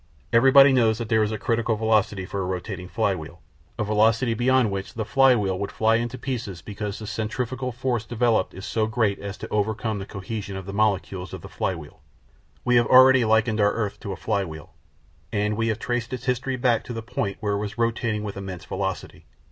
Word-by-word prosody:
Everybody 135 +3 +7
knows 115 -4 +3
that 115 -2 -5
there 110 -1 +3
is 105 0 +1
a 110 - -2
critical 115 +1 0
velocity 105 -3 +1
for 100 +1 -4
a - - -1
rotating 90 0 -4
flywheel, - - -2 0.4
a 115 - 0
velocity 110 +3 +2
beyond 125 -1 +2
which 95 0 -5
the 110 -2 -2
flywheel 115 -8 +3
would 100 - -3
fly 110 +1 +2
into 120 +2 -3
pieces 115 - -5
because 105 0 -5
the 110 - -8
centrifugal 125 +4 -3
force 120 -2 -2
developed 115 -4 0
is 95 - -8
so 110 -1 0
great 110 -3 0
as 100 0 -6
to - - -7
overcome 110 +1 -1
the 95 - -7
cohesion 100 0 -5
of 95 - -7
the 100 - -7
molecules 100 -3 -1
of - - -9
the - - -9
flywheel. 80 -6 -4 0.6
We 125 -1 +4
have 120 - +3
already 130 0 +7
likened 110 0 +2
our 105 0 +3
earth 105 -3 -3
to 100 - -6
a - - -3
flywheel, 80 -7 -3 0.6
and 105 -1 0
we 115 +1 0
have 110 -2 0
traced 120 +1 -3
its 125 - -5
history 125 +1 -1
back 125 -2 +1
to 120 - -6
the 115 -1 -5
point 105 -4 -3
where 105 -2 -1
it 100 - 0
was 105 +1 -5
rotating 115 -2 0
with 105 -2 -5
immense 95 -4 -7
velocity. 95 -1 -4
110 Hz, 205 wpm, -24 LUFS, 100-120 Hz, 0.6 s, Everybody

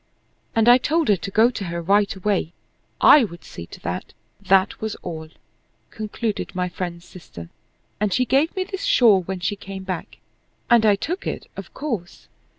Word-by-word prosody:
"And 225 0 +3
I 245 +1 +8
told 315 +2 0
her 205 - +6
to 195 - -6
go 220 +5 +4
to 200 - -5
her 170 0 -4
right 200 +4 +2
away, 190 -3 -1 0.5
I 290 - +8
would 170 -6 -6
see 85 - -9
to - - -12
that; 90 +2 -5 0.3
that 190 0 +2
was 220 -1 -3
all," 160 -3 -6 0.6
concluded 215 -1 -4
my 180 0 -1
friend's 175 -1 -6
sister; 120 - -11 0.5
"and 210 -1 0
she 255 +4 +2
gave 275 +6 +2
me 375 - 0
this 385 +2 -6
shawl 235 - +5
when 185 +1 -5
she 200 +3 -1
came 195 -1 -8
back, 185 -2 -6 0.5
and 230 -2 +6
I 205 - +5
took 330 - -4
it, - - -4
of - - -9
course. 225 - -5
200 Hz, 180 wpm, -22 LUFS, 180-235 Hz, 0.6 s, I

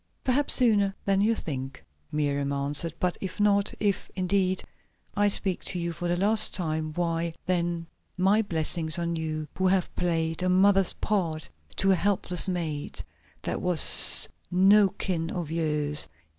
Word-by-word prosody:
"Perhaps 270 +3 +1
sooner 205 -6 +2
than 195 -1 +1
you 225 +2 +2
think," 135 - -7 0.3
Miriam 145 -2 -1
answered. 145 +3 -2
"But 180 -1 -2
if 190 +2 -6
not, 200 0 +2
if, 205 -2 -1
indeed, 185 0 0 0.5
I 205 0 +2
speak 195 -2 -1
to 180 - 0
you 170 -1 -3
for 175 +2 -5
the 175 0 0
last 210 +3 +3
time, 155 -3 -3
why, 170 -1 -2
then, 175 -2 -2 0.3
my 195 +4 +3
blessings 160 -4 -1
on 170 0 -2
you 155 -1 -4
who 185 - 0
have 185 -1 0
played 165 -2 -1
a 185 - 0
mother's 195 0 +3
part 170 -7 -3 0.3
to 195 0 +2
a - - +4
helpless 185 -1 -1
maid 165 -5 -4 0.4
that - - -4
was 180 -4 +7 0.2
no 195 +3 +4
kin 175 -4 -3
of 170 -4 -5
yours. 150 -2 0
175 Hz, 155 wpm, -26 LUFS, 160-195 Hz, 0.5 s, was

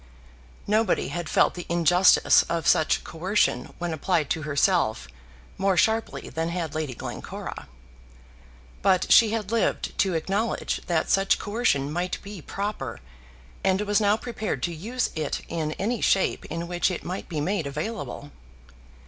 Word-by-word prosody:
Nobody 215 -1 +1
had 175 -2 -4
felt - - +3
the 175 - -8
injustice 175 +2 +5
of 170 -1 -1
such 155 - +3
coercion 175 - 0
when 175 -2 -3
applied 160 -1 0
to 160 - 0
herself 150 - +1 0.5
more 195 -1 +2
sharply 225 +3 +1
than 165 +1 -2
had 170 -3 -3
Lady 155 -5 -3
Glencora. - - -7 1.1
But 185 -1 +2
she 225 - +8
had 215 -2 -3
lived 230 -1 0
to 190 -4 +2
acknowledge 195 +8 -1
that 165 -2 0
such 195 0 +3
coercion 205 - 0
might 175 +2 -2
be 200 -3 -8
proper, 200 +6 -4 0.6
and 190 +1 +2
was 205 +1 +1
now 205 +1 +3
prepared 225 -2 -4
to 175 - -1
use 230 +10 -2
it 155 -2 -3
in 155 -2 -2
any 225 +7 -2
shape 195 - +2
in 165 +1 -5
which 175 +1 +1
it 180 - -4
might 180 +2 -5
be 160 -4 -3
made 165 0 -1
available. 150 -1 -5
180 Hz, 150 wpm, -25 LUFS, 160-205 Hz, 1.1 s, she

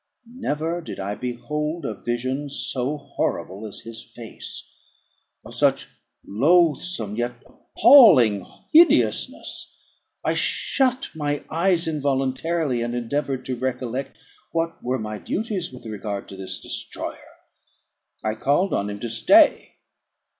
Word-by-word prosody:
Never 170 - -3
did - - -8
I 100 +1 -3
behold 150 +7 -4
a 110 - -2
vision 130 +6 -3
so 135 +1 -2
horrible 110 -7 -3
as 105 - -7
his 115 -1 -8
face, 115 -1 -8 0.8
of - - -10
such - - +2 0.4
loathsome, 150 - +2
yet 120 +1 -1
appalling 130 - +6 0.3
hideousness. 335 +2 +3 0.5
I - - +2
shut 260 -1 0
my 145 -2 -2
eyes 170 0 +2
involuntarily, 140 -1 0
and 120 +1 -2
endeavoured 130 +2 -2
to 130 - -2
recollect 130 +1 -3 0.3
what 165 0 -2
were 125 +2 0
my 110 -2 -5
duties 205 - -3
with 125 -2 -12
regard 105 -2 -5
to 95 - -8
this 95 -1 -5
destroyer. - - -6 0.9
I 110 - 0
called 145 - +1
on 100 - 0
him 100 0 -6
to 120 - -2
stay. 115 0 +4
130 Hz, 120 wpm, -23 LUFS, 115-165 Hz, 0.9 s, appalling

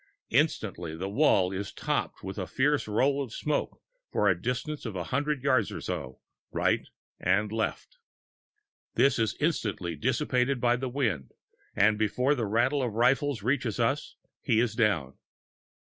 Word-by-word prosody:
Instantly 95 - 0
the 95 +4 -4
wall 100 -5 +3
is 95 +1 -4
topped - - -2
with 95 +2 -5
a 95 - -3
fierce 145 - +1
roll 135 +7 +2
of 125 - -9
smoke 150 +6 -2 0.3
for 105 - +2
a 90 -3 +2
distance 125 +6 -3
of 110 -5 -5
hundreds 140 - -1
of - - -20
yards 130 -6 +1
to, 80 -8 -4 0.4
right - - +1 0.3
and 100 +3 +1
left. 115 - -3 1.0
This 135 -3 +4
is 110 -2 +1
as - - -20
instantly 105 - -1
dissipated 125 - +1
by 120 0 +3
the 130 +1 -3
wind, 110 - -1 0.4
and 105 +1 +4
before 125 +6 +2
the 120 -7 -1
rattle 120 +7 +2
of 120 -4 -1
the - - -7
rifles 135 -1 +2
reaches 125 -1 0
us, 135 +6 0 0.3
he 115 -4 +2
is 115 -2 +1
down. 100 - 0
115 Hz, 160 wpm, -28 LUFS, 100-135 Hz, 1.0 s, This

